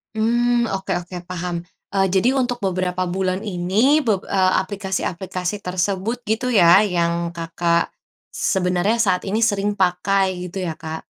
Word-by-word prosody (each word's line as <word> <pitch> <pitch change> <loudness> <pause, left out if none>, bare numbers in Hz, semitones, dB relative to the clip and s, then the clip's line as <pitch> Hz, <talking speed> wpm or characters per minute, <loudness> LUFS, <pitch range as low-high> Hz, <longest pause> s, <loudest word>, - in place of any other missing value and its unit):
Hmm, 240 +1 +2
oke 190 0 -2
oke, 180 +1 -10
paham. 175 -1 -4 0.3
Eee, 195 -1 +3
jadi 245 +8 +3
untuk 245 -2 -1
beberapa 185 -1 -1
bulan 185 +1 -1
ini, 205 +9 +2
beb 205 -5 +1
eee, 185 -1 +3
aplikasi-aplikasi 190 -1 -3
tersebut, 190 +6 -1
gitu 250 +3 0
ya, 185 0 +6
yang 170 -2 -1
Kakak 170 0 0 0.4
sebenarnya 190 +4 +1
saat 185 -5 +1
ini 210 +3 -1
sering 205 -2 +1
pakai, 190 0 +1
gitu 185 +2 -5
ya 165 -3 -4
Kak? 160 0 -7
190 Hz, 140 wpm, -21 LUFS, 180-210 Hz, 0.4 s, ya